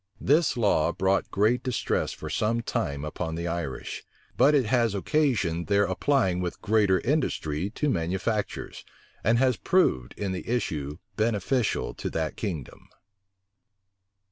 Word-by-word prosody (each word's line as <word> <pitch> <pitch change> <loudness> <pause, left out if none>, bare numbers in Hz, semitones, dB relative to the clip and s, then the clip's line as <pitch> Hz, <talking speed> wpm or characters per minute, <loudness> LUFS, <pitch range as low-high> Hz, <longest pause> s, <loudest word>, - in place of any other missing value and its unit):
This 150 +2 +3
law 100 -8 +3
brought 95 +3 +1
great 110 +5 +2
distress 125 -2 -1
for - - -8
some 115 +2 0
time 75 - -2
upon 80 +1 -4
the 85 +1 -3
Irish; 85 -6 -4 0.3
but 150 +2 +5
it 135 -4 +3
has 115 -2 +2
occasioned 100 - +1
their 100 0 +3
applying 95 -2 +1
with 90 -1 -4
greater 105 -3 +3
industry 95 - -1
to 150 +7 -2
manufactures, 95 - -2 0.4
and 115 +3 +3
has 130 -1 +3
proved 65 - +1
in 100 -2 -2
the 95 - -5
issue 75 - -2 0.2
beneficial 110 - 0
to - - -4
that 80 -1 -2
kingdom. 85 - -5
100 Hz, 135 wpm, -27 LUFS, 85-120 Hz, 0.4 s, but